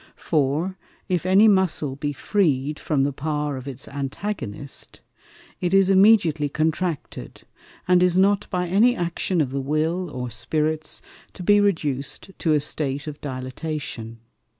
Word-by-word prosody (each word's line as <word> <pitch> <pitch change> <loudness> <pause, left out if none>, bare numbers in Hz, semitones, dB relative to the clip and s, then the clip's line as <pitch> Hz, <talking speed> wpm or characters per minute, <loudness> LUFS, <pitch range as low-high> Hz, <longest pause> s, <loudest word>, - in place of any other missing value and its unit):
For, 160 +5 0 0.3
if 180 -2 -1
any 195 +4 +6
Muscle 185 -9 +2
be 145 +1 -3
freed 150 -3 0
from 145 -4 0
the 140 0 0
power 150 0 -2
of 130 +1 -8
its 135 0 -4
Antagonist, 140 - -5 0.6
it 180 +1 +1
is 195 0 +5
immediately 190 -7 +4
contracted, 160 - -3 0.4
and 180 0 +5
is 180 0 +3
not 200 +2 +3
by 180 -1 -1
any 220 +8 +4
Action 175 -1 -1
of 135 -4 -1
the 135 0 -2
Will, 160 +6 -1
or 125 -3 -5
Spirits, 155 +5 -2 0.3
to 180 - -8
be 205 +3 +5
reduced 150 -5 -1
to 160 - +2
a 150 - +4
State 140 -1 -2
of 150 -1 -7
Dilatation. 130 -3 -5
155 Hz, 145 wpm, -23 LUFS, 140-185 Hz, 0.6 s, any